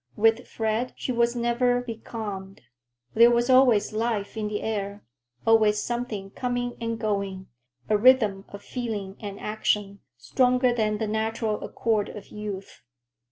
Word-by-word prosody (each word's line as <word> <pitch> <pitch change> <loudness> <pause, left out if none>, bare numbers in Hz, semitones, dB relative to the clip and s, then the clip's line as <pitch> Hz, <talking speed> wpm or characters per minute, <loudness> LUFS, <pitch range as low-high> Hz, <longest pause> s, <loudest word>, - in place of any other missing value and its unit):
With 225 +3 +3
Fred 225 +2 -1
she - - -3
was 235 0 +2
never 245 +1 +2
becalmed. 220 -5 -6 0.5
There 230 +2 +7
was 240 +2 +2
always 250 -6 +5
life 220 -2 -1
in 215 -1 -2
the 210 0 -3
air, 205 -2 -3 0.4
always 215 -2 +4
something 220 -4 -4
coming 245 0 -2
and 230 0 -2
going, 200 -3 -2 0.4
a 210 -1 +2
rhythm 215 -5 +4
of 200 0 -10
feeling 215 -6 -4
and 200 -3 -7
action,—stronger 210 - 0
than 215 -2 0
the 220 - -1
natural 220 0 -1
accord 220 -3 0
of 210 - -10
youth. 205 - -7
220 Hz, 135 wpm, -26 LUFS, 205-240 Hz, 0.5 s, There